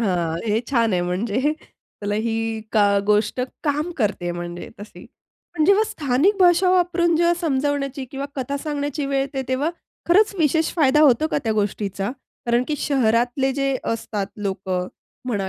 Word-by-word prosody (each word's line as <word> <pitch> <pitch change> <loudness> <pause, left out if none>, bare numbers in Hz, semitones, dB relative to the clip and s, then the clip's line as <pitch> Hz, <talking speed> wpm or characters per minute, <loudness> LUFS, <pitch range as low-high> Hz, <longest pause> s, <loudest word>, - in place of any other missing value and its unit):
हां, 175 -6 0
हे 215 +1 +1
छान 230 -5 +2
आहे. 175 -1 +1
म्हणजे 220 +11 0
त्याला 205 0 -7
ही 225 -1 -1
का 205 -2 +4
गोष्ट 210 +3 +2 0.2
काम 300 +3 0
करते 200 -6 0
म्हणजे 175 0 -6
तशी. 210 - -11 0.5
पण 310 -3 +2
जेव्हा 400 +5 +5
स्थानिक 290 +8 +1
भाषा 360 0 +5
वापरून 350 -2 +2
जेव्हा 340 +1 +3
समजण्याची 280 -3 -1
किंवा 275 +1 -4
कथा 270 +2 -2
सांगण्याची 290 0 -3
वेळ 275 0 0
येते, 270 0 -3
तेव्हा 265 +5 0 0.4
खरंच 410 +4 +4
विशेष 320 0 +2
फायदा 300 -3 +4
होतो 300 0 +5
का - - 0
त्या 220 - +1
गोष्टीचा? 200 -1 -2 0.4
कारण 240 +1 +2
की 300 - 0
शहरातले 250 0 +1
जे 275 -1 0 0.2
असतात 210 -3 -3
लोक 195 -2 -4
म्हणा 190 +3 -4
260 Hz, 155 wpm, -22 LUFS, 210-300 Hz, 0.5 s, जेव्हा